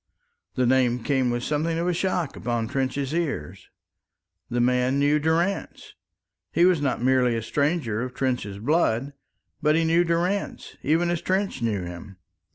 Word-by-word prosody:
The 130 - +2
name 125 -1 +2
came 130 -3 +1
with 120 0 -2
something 155 +3 -1
of 170 +1 -1
a 180 - +2
shock 175 -3 -1
upon 115 -1 -2
Trench's 135 +2 -2
ears. 100 - -3 0.8
This 120 0 -1
man 125 +2 +2
knew 145 +2 +3
Durrance! 165 +6 -1 0.6
He 170 - +4
was 180 -5 +3
not 130 -4 -1
merely 125 -2 +3
a 115 - -3
stranger 140 -6 0
of 125 0 -5
Trench's 125 -7 -2
blood, 135 +1 +1 0.5
but 150 +1 +3
he 165 - +2
knew 165 +2 +3
Durrance 175 +4 -2
even 165 +4 +1
as 175 - -1
Trench 190 -7 -1
knew 105 -5 -1
him. 90 +2 -9
135 Hz, 160 wpm, -25 LUFS, 120-165 Hz, 0.8 s, He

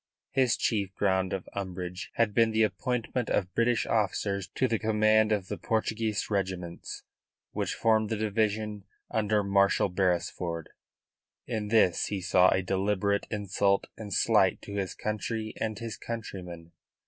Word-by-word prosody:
His 130 -3 +2
chief 100 -4 -1
ground 95 -2 +1
of 95 -2 -4
umbrage 90 -2 -5
had 110 -3 +2
been 115 0 +4
the 110 0 +2
appointment 125 +1 -1
of 95 -2 0
British 115 0 +2
officers 100 -3 0
to 130 - +2
the 115 -2 0
command 110 0 +3
of 100 -3 0
the - - -5
Portuguese 110 -1 -1
regiments 95 -4 -3 0.5
which - - -2
formed 110 -1 +2
the 110 - -1
division 105 -1 -1 0.3
under 105 -1 +1
Marshal 100 0 +3
Beresford. 90 -2 -1 0.8
In 110 -3 -3
this 105 -5 +3
he 100 - -2
saw 90 0 +4
a 95 - +1
deliberate 100 +2 0
insult 100 -1 +1
and 105 -2 -8
slight - - +3
to 100 - -8
his 100 -2 -2
country 110 +1 -3
and 110 -1 -2
his 115 -1 -5
countrymen. 90 -7 -7
105 Hz, 145 wpm, -29 LUFS, 95-110 Hz, 0.8 s, been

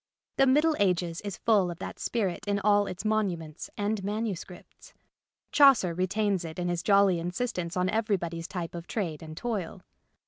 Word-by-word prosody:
The 270 - +5
Middle 300 +4 +4
Ages 175 -4 +1
is 200 -2 -5
full 205 -6 +3
of 170 - -6
that - - -7
spirit 200 -7 -2
in 200 0 +1
all 205 0 +3
its 185 +3 -6
monuments 180 -8 -2
and 205 0 -1
manuscripts. 200 -4 -5 0.6
Chaucer 270 - +6
retains 195 +1 0
it 160 -1 -7
in 175 0 -1
his 175 -1 -1
jolly 200 -3 +4
insistence 180 0 -3
on 180 0 +2
everybody's 185 -6 -1
type 175 -4 -5
of 170 0 -7
trade 170 -9 -3
and 155 -1 -9
toil. 200 -6 -4
190 Hz, 165 wpm, -28 LUFS, 175-215 Hz, 0.6 s, Chaucer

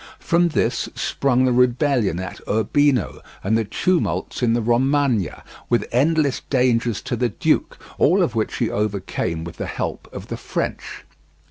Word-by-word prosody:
From 170 +1 +2
this 160 - 0
sprung 130 -2 +1
the 130 - +2
rebellion 125 - +2
at 95 - -6
Urbino 125 +3 +1 0.2
and 105 +3 +1
the 115 - +2
tumults 180 - -1
in 120 -2 +3
the 120 - +1
Romagna, 120 - +1 0.3
with 120 - +2
endless 145 +2 +2
dangers 120 -4 +1
to - - -2
the 125 -1 0
duke, 100 - 0 0.2
all 185 +5 +4
of 125 - -1
which 110 -2 -1
he 115 - 0
overcame 95 -5 -2
with 85 -1 -8
the - - -4
help - - -4
of - - -9
the - - -4
French. - - -4
120 Hz, 155 wpm, -21 LUFS, 110-140 Hz, 0.3 s, all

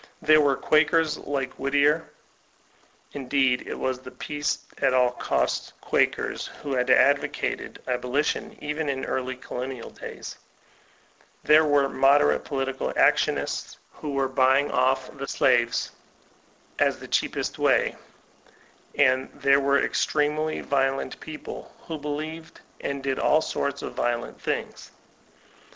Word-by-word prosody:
There 155 0 +5
were 140 -2 +3
Quakers 155 +1 +2
like 135 -2 -3
Whittier 145 +3 +2 1.0
(in 135 -3 -7
deed 130 -2 +2
it - - -4
was 130 -1 -2
the 130 - -10
peace 145 +2 -3 0.2
at 130 - +2
all 125 -1 +4
costs - - -1
Quakers - - 0
who 140 -2 -6
had 125 0 0
ad 140 +2 +6
vocated - - -4
abolition 125 +4 -1
even 150 0 -2
in 135 -1 -2
early 130 0 -2
colonial 125 -1 -6
days); - - -9 1.0
there 155 +1 +6
were 145 -2 +3
moderate 140 +2 +3
political 135 -2 -2
actionists, - - +1 0.2
who 150 -2 -6
were 135 -1 +1
for 130 - -14
bujring 135 +2 +3
off 130 +1 +1
the 140 - -4
slaves, 120 0 +2 0.9
as - - +2
the - - -10
cheapest - - -1
way; - - +2 1.0
and 130 -1 +3
there 140 0 +4
were 140 0 +2
extremely 155 +1 0
violent 135 -1 -1
people, 155 -1 -8
who 160 -2 -6
believed 155 +2 -6 0.2
and 140 -1 -4
did 135 -1 -1
ail 155 - +4
sorts 140 -3 -3
of - - -5
violent 120 0 -2
things. - - -4
140 Hz, 130 wpm, -25 LUFS, 130-150 Hz, 1.0 s, ad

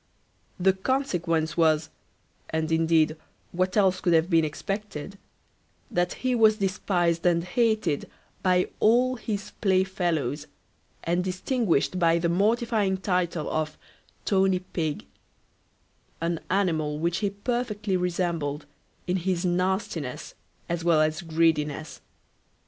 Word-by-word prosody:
The 190 +1 +4
consequence 175 - -1
was 160 -2 +2 0.6
(and 160 0 -1
indeed 160 -1 +3 0.4
what 185 +3 0
else 190 -2 +3
could 175 -3 +2
have 165 +3 +3
been 165 -1 +5
expected) 195 +2 -5 0.7
that 175 0 0
he 255 - +3
was 220 -2 +5
despised 180 -4 0
and 170 -1 +3
hated 215 -5 0 0.3
by 180 -1 +2
all 250 +4 +3
his 205 -3 -4
play 190 -3 +3
fellows, 160 -7 -2 0.6
and 175 +2 0
distinguished 185 - 0
by 165 -1 +4
the 170 0 0
mortifying 210 +1 +1
title 180 -4 -1
of 155 0 -2 0.5
Tony 190 -2 +3 0.2
Pig; 155 -4 -2 1.1
an 165 0 -1
animal 160 -6 0
which 170 +2 0
he 205 - 0
perfectly 210 -1 -2
resembled 170 -5 -1 0.4
in 180 +1 0
his 185 0 -1
nastiness 180 -6 -2 0.3
as 170 -1 -2
well 165 -2 +4
as 155 +3 +1
greediness. 155 -2 0
180 Hz, 115 wpm, -26 LUFS, 160-195 Hz, 1.1 s, been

